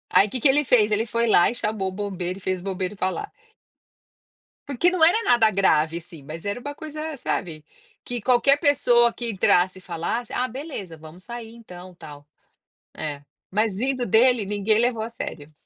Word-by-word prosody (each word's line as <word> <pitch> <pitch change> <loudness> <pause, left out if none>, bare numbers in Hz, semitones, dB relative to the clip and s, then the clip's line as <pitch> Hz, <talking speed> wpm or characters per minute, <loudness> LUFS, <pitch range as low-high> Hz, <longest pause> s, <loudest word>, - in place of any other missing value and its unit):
Aí 200 - +6
que 255 - -4
que - - +5
ele 295 +2 +3
fez? 220 -4 +3
Ele 215 +2 +1
foi 230 +2 0
lá 175 -5 +5
e - - -6
chamou 210 -4 -2
o - - -8
bombeiro 185 -2 -4
e - - -20
fez 185 -1 -2
o - - -13
bombeiro 190 0 -3
falar. 190 - -2 1.4
Porque 285 +6 +2
não 355 -3 +1
era 395 +8 +5
nada 225 -3 +4
grave, 165 -4 +2
assim, 165 -3 -11
mas 160 +3 -8
era 205 +4 -3
uma 285 +3 -6
coisa, 310 0 -6
sabe, 160 -9 -4 0.4
que 245 0 -4
qualquer 260 +4 +3
pessoa 240 -5 +3
que 235 -1 -5
entrasse 185 -2 +2
e - - -18
falasse, 180 +8 -4
ah, 255 - 0
beleza, 255 - -7
vamos 160 +4 -13
sair 235 -2 -8
então 185 -5 -12
tal, 145 -3 -12 0.7
é, 145 -2 -5 0.3
mas 210 0 0
vindo 255 +1 -1
dele 230 0 +4
ninguém 210 +1 +1
levou 235 -1 +1
a 225 - -3
sério. 155 -9 -7
215 Hz, 190 wpm, -23 LUFS, 180-245 Hz, 1.4 s, Aí